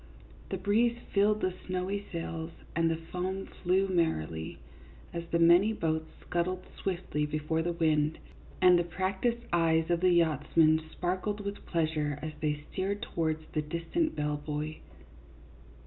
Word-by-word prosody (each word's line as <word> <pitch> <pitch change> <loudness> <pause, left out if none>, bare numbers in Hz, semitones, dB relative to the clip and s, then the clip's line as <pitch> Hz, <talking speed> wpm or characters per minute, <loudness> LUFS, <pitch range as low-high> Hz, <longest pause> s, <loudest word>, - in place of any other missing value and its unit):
The - - -2
bre"eze 230 +3 +2 0.2
filled 210 +1 +3
the 185 -1 +1
snowy 185 +2 -2
sails 165 -1 -4 0.3
and 165 0 +3
the 165 - +1
foam 180 +4 -4
flew 190 +2 +1
merrily, 80 - -1 0.6
as 170 0 -4
the 170 - +1
many 175 +6 +6
boats 160 -4 -1
scudded 180 +1 -1
swiftly 175 -5 -2
before 155 +2 -1
the 175 +1 0
wind, 155 -2 +2 0.5
and 180 -1 +8
the - - +2
practised 190 +7 -1
eyes 165 -1 +3
of 170 - +3
the 185 +1 +4
yachts 165 -4 +2
men 160 -1 +6
sparkled 185 +4 -2
with 200 0 -6
pleasure 155 -3 0
as 155 +1 -5
they 150 -1 -1
steered 200 +3 -2
towards 160 -6 -1
the 155 - 0
distant 170 - -1
bell 150 0 -1
buoy. 150 +1 -4
170 Hz, 150 wpm, -30 LUFS, 155-185 Hz, 0.6 s, and